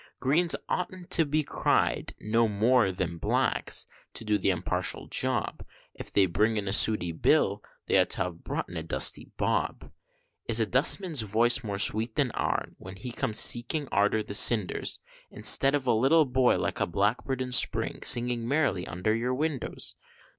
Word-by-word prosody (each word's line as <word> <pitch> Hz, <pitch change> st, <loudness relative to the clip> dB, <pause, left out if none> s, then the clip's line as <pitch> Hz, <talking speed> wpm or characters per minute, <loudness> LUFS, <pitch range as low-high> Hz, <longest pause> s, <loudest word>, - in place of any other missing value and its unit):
Greens 160 Hz, +7 st, +1 dB
oughtn't 180 Hz, 0 st, -5 dB
to 165 Hz, -3 st, +4 dB
be 150 Hz, +1 st, -1 dB
cried -, -, -1 dB
no 115 Hz, +2 st, 0 dB
more 110 Hz, 0 st, +1 dB
than 85 Hz, -2 st, -5 dB
blacks -, -, -1 dB, 0.3 s
to 115 Hz, -, -6 dB
do 105 Hz, -1 st, 0 dB
the 95 Hz, -, 0 dB
unpartial 90 Hz, 0 st, -2 dB
job, -, -, -1 dB, 0.3 s
If -, -, -10 dB
they 100 Hz, -, +3 dB
bring 105 Hz, +5 st, 0 dB
in 105 Hz, -1 st, -4 dB
a 95 Hz, -, -1 dB
Sooty 105 Hz, -6 st, +4 dB
Bill, 80 Hz, -, 0 dB, 0.2 s
they -, -, +2 dB
ought -, -, +1 dB
to -, -, -2 dB
have 85 Hz, -2 st, -8 dB
brought -, -, -5 dB
in 85 Hz, -, -9 dB
a -, -, -3 dB
Dusty 80 Hz, -, 0 dB
Bob. -, -, -3 dB, 0.6 s
Is 115 Hz, 0 st, +3 dB
a 110 Hz, -, +1 dB
dustman's 150 Hz, -, +3 dB
voice 115 Hz, +4 st, +1 dB
more 100 Hz, -3 st, -5 dB
sweet 110 Hz, +3 st, +3 dB
than 140 Hz, -5 st, 0 dB
ourn, -, -, -3 dB
when 95 Hz, +1 st, -11 dB
he 115 Hz, +6 st, -8 dB
comes 110 Hz, -2 st, -1 dB
a -, -, +8 dB
seeking 130 Hz, +5 st, +1 dB
arter 105 Hz, +2 st, +1 dB
the 100 Hz, -, -8 dB
cinders, 105 Hz, -2 st, +2 dB, 0.3 s
Instead 135 Hz, +1 st, +3 dB
of 140 Hz, -3 st, -3 dB
a 125 Hz, -, +2 dB
little 140 Hz, +8 st, +3 dB
boy 130 Hz, -1 st, +1 dB
like -, -, -4 dB
a -, -, -1 dB
blackbird 110 Hz, +8 st, -2 dB
in 130 Hz, -1 st, -5 dB
spring, 125 Hz, -, +2 dB
singing 120 Hz, -1 st, +2 dB
merrily 140 Hz, -, -1 dB
under 90 Hz, +6 st, -2 dB
your 125 Hz, +3 st, -2 dB
windows? 150 Hz, -1 st, -3 dB
115 Hz, 180 wpm, -27 LUFS, 100-130 Hz, 0.6 s, a